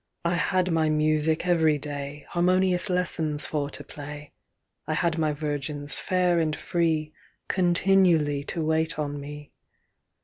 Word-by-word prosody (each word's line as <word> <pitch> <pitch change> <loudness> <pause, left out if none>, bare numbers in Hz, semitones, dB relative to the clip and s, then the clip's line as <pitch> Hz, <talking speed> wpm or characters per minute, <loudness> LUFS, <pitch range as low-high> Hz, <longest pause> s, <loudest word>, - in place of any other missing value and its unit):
XXI'I 170 +1 +2
had 185 0 +1
my 160 -1 +2
music 155 +1 +1
every 160 -4 +3
day, 145 0 -6
Harmonious 185 +2 +2
lessons 165 -4 0
for 145 -2 -2
to - - -8
play;I 150 0 -9
had 170 -1 0
my 155 -1 +2
virgins 145 -1 -3
fair 180 -2 +1
and 155 -2 0
freeContinually 170 -1 +1
to 165 -2 -2
wait 160 +1 0
on 145 -1 -3
me. 145 0 -9
155 Hz, 125 wpm, -26 LUFS, 150-175 Hz, -, every